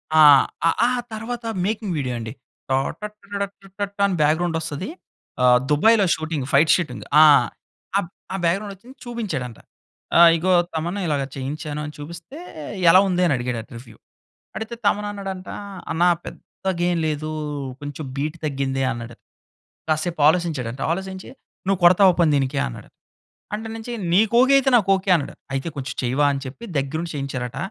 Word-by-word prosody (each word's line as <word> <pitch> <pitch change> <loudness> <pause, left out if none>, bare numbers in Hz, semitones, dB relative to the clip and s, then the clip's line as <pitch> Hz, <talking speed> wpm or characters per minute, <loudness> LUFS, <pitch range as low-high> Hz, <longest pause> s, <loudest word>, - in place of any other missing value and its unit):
ఆ! - - +6 0.7
ఆహ్, 250 0 0
తర్వాత 230 +2 -5 0.2
మేకింగ్ 210 -3 -2
వీడియో 130 -4 -2
అండి. 110 0 -6 0.4
టా 130 - +3 0.2
టటరడటం 200 -1 -6
టాటాం 200 0 -2
అని 190 - -1
బ్యాక్‌గ్రౌండ్ 160 +3 +2
వస్తది. 160 - -5 0.5
ఆహ్, 125 0 +6
దుబాయ్‌లో 205 +7 +5
షూటింగ్, 155 -3 -3
ఫైట్ 150 +3 +5
షూటింగ్ 155 -8 -3 0.2
ఆ! - - +10 1.1
ఆ - - -1
బ్యాక్‌గ్రౌండ్ 195 +4 0
వచ్చింది 245 +8 -16
చూపించాడంట. 210 - -4 0.8
"ఇగో 185 +3 0 0.2
తమన్ 170 +5 -2
ఇలాగా 145 -3 0
చేయించాను 145 +3 -5
అని 150 - -7
చూపిస్తే 170 - -9 0.5
ఎలా 185 +3 +8
ఉంది" 180 -1 +1
అని 165 - +3
అడిగాడట, 120 -2 -4
రివ్యూ. 115 -2 -13 0.6
అడిగితే, 220 +2 -5
తమన్ 205 +1 +2
అన్నాడంట 195 -2 -6 0.4
"అన్నా 170 +2 +3 0.2
పెద్దగా 185 -2 -5
ఏం 175 - 0
లేదు, 155 0 -3 0.5
కొంచెం 145 +1 -6
బీట్ 155 +4 -2
తగ్గింది" 135 -2 -1
అన్నాడట. 120 -1 -7 0.7
కాసేపు 155 +1 -1
ఆలోచించాడంట, 150 -7 0
ఆలోచించి 190 +1 -6 0.4
"నువ్వు 195 -2 +1
కొడతావా 185 +1 +7
పోనీ 165 -3 +4
దీనికి" 135 0 0
అన్నాడు. - - -10 0.7
అంటే 220 +1 -6
నుంచి 225 +2 -6 0.2
"నీకు 215 +4 +3
ఓకే 265 +2 +4
అయితే, 270 - +1
నాకు 200 -4 0
ఓకే." 190 +1 -4
అన్నాడు. 145 - -6 0.2
అయితే 135 +5 -3
"కొంచెం 135 -1 -5
చెయ్యవా" 130 +4 +2
అని 135 - -4
చెప్పి 145 - -9
దగ్గర 140 +3 -3
ఉండి 170 - -6
చేయించారట. 130 -3 -4
165 Hz, 145 wpm, -22 LUFS, 140-200 Hz, 1.1 s, ఆ